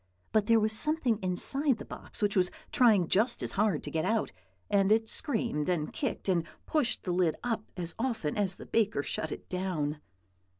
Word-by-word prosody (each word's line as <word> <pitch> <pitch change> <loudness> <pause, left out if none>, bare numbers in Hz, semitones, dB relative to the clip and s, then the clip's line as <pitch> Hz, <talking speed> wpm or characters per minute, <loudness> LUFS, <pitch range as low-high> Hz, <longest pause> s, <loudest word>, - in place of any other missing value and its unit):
But 215 -1 +2
there 230 -1 +5
was 215 0 +1
something 255 -2 +1
inside 260 +9 +1
the - - -8
box - - -6
which 205 0 +2
was 180 -2 +3 0.2
trying 220 - +5
just 225 +8 +1
as - - -2
hard 200 -6 +1
to - - -6
get 160 -1 0
out, 220 +3 0 0.4
and 200 0 +3
it 225 +1 +3
screamed 225 - -1
and 160 -4 -1
kicked, 270 -7 -3
and 175 -3 +2 0.2
pushed 255 -6 0
the 180 - -2
lid 175 -3 +2
up 225 -3 -2
as 175 -1 0
often 225 - -1
as 195 -3 +1
the - - -10
baker 215 -9 +1
shut 155 - -3
it - - -7
down. 160 -5 -2
205 Hz, 195 wpm, -30 LUFS, 180-230 Hz, 0.4 s, there